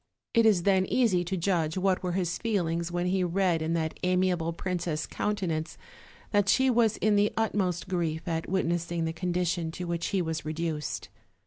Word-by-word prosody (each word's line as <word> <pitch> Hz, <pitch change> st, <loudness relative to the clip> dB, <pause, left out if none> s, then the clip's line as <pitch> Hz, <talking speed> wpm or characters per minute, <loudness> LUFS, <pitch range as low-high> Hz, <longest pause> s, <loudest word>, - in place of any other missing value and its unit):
It 230 Hz, -1 st, +5 dB
is 190 Hz, -6 st, +3 dB
then 190 Hz, -1 st, +3 dB
easy 215 Hz, -9 st, +2 dB
to 190 Hz, +2 st, -2 dB
judge 170 Hz, -2 st, 0 dB
what 185 Hz, 0 st, +1 dB
were 180 Hz, -1 st, -2 dB
his 180 Hz, -2 st, -1 dB
feelings 170 Hz, -6 st, -1 dB
when 175 Hz, 0 st, -1 dB
he 185 Hz, +1 st, +1 dB
read 175 Hz, -2 st, +1 dB
in 160 Hz, +1 st, -1 dB
that 160 Hz, -1 st, -2 dB
amiable 180 Hz, -2 st, +1 dB
princess' 170 Hz, -3 st, -2 dB
countenance 180 Hz, -7 st, -2 dB, 0.5 s
that 205 Hz, -2 st, +2 dB
she 265 Hz, +4 st, +4 dB
was 230 Hz, -3 st, +3 dB
in 215 Hz, -1 st, +2 dB
the 205 Hz, +1 st, +3 dB
utmost 190 Hz, -6 st, 0 dB
grief 165 Hz, -3 st, -2 dB
at 165 Hz, -1 st, -2 dB
witnessing 170 Hz, -2 st, 0 dB
the 160 Hz, -, -2 dB
condition 175 Hz, -1 st, -1 dB
to 180 Hz, -, -5 dB
which 170 Hz, -1 st, -2 dB
he 195 Hz, -, 0 dB
was 160 Hz, -2 st, -2 dB
reduced. 155 Hz, 0 st, -3 dB
180 Hz, 180 wpm, -28 LUFS, 165-195 Hz, 0.5 s, It